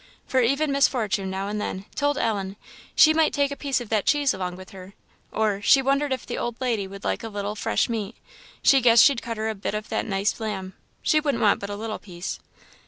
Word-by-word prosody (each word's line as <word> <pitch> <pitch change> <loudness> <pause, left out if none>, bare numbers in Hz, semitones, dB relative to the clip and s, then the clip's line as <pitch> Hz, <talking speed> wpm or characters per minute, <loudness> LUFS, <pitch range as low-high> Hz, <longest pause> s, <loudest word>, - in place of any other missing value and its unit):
For 260 - +1
even 275 +5 +1
Miss 275 0 +4
Fortune 210 -6 -2
now 190 +1 -3
and 210 0 -3
then 190 -1 -4
told 290 0 0
Ellen 200 -6 -1 0.4
"she 310 - +7
might 315 -1 +2
take 285 -1 +1
a - - -3
piece 280 -2 -1
of 240 -3 -8
that 215 -3 0
cheese 290 -2 +3
along 180 -1 -4
with 185 +1 -12
her;" 190 0 -12 0.4
or, 210 -2 0
"she 270 +6 +6
wondered 275 +2 +1
if 260 -2 -2
the 240 - -4
old 240 -1 -4
lady 230 -6 -1
would 195 +1 -10
like - - -1
a 225 - -6
little 205 0 -4
fresh - - 0
meat; 225 -2 -4 0.5
she 270 -1 +6
guessed 230 -2 +7
she'd 275 -5 +4
cut 230 -1 -5
her 220 +1 -2
a 220 - -1
bit 200 0 -4
of 215 0 -5
that - - -2
nice 200 +1 -1
lamb; 195 -4 -4 0.3
she 310 - +3
wouldn't 290 -5 -1
want 205 -2 +4
but 200 - -6
a 205 - -4
little 220 +1 -5
piece." 180 -2 -6
220 Hz, 240 wpm, -24 LUFS, 200-270 Hz, 0.5 s, she